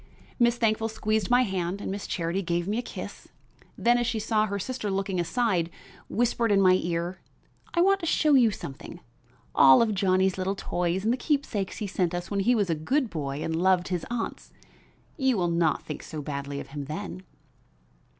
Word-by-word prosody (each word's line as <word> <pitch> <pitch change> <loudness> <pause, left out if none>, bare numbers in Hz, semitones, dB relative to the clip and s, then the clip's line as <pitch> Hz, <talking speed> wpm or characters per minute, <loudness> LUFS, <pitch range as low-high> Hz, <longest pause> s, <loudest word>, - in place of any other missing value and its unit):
Miss 240 0 +4
Thankful 225 -1 +1
squeezed 215 -2 -1
my 245 +1 +5
hand 190 -3 -2
and 200 - -4
Miss 200 +1 -5
Charity 170 +2 -1
gave 175 -1 -1
me 215 +3 0
a - - 0
kiss; - - -8 0.5
then 240 +1 +3
as 240 - 0
she 230 -2 -1
saw 215 0 +1
her 200 0 -2
sister 225 +1 -4
looking 195 -1 -1
aside, 180 -2 0 0.4
whispered 235 -1 +1
in 200 - +4
my 185 -1 +6
ear 170 +2 -2 0.6
"I 340 - +4
want 390 +2 +4
to 335 - -4
show 305 -2 +3
you 250 -4 +6
something, 170 -3 -8 0.5
all 135 -1 +7
of 225 -2 +2
Johnnie's 190 -1 +2
little 190 +2 -1
toys 180 0 -1
and 225 +3 +2
the - - -1
keepsakes 250 - -1
he 215 - -3
sent 180 -3 -1
us 175 +2 -5
when 200 - 0
he 240 +6 +3
was 200 -6 +1
a - - +3
good 235 - 0
boy 145 -2 -3
and 160 - -2
loved 180 +1 +2
his 180 -3 -2
aunts. 235 -1 -4 0.7
You 265 -5 +2
will 175 -2 +1
not 170 -1 +1
think 150 - -6
so 155 - -7
badly 140 -1 -4
of - - -8
him 140 0 -6
then." 175 +5 -6
195 Hz, 200 wpm, -27 LUFS, 175-230 Hz, 0.7 s, all